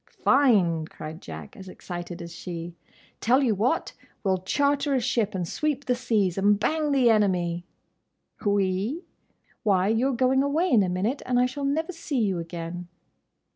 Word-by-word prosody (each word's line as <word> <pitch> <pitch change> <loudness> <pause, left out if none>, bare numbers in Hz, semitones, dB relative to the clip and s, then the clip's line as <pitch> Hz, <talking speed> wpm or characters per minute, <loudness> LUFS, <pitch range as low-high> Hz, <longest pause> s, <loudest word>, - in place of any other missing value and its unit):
"Fine!" 190 - +4
cried 155 +1 -9
Jack, 80 -2 -9
as 190 -1 -10
excited 175 -1 -7
as 170 0 -9
she. 170 -1 -6 0.5
"Tell 255 +5 +3
you 235 -4 +3
what! 235 - 0 0.3
We 195 - +2
'll 185 - +1
charter 280 +8 +1
a - - +3
ship, 230 -4 0
and 180 -2 -2
sweep 290 - -2
the 250 - +2
seas, 215 -7 0
and 205 +1 +3
bang 305 +6 0
the 255 -4 +4
enemy!" 180 -5 +1 0.8
"'We'?—Why, 200 - -1
you're 245 +5 +2
going 260 +2 +3
away 305 +6 +1
in 230 -5 +6
a 185 - +1
minute, 200 +10 -1
and 250 -1 +2
I 250 - +4
shall 275 +3 -3
never 320 +6 0
see 330 -4 -4
you 195 -6 +1
again." 170 +1 -6
210 Hz, 165 wpm, -26 LUFS, 180-265 Hz, 0.8 s, in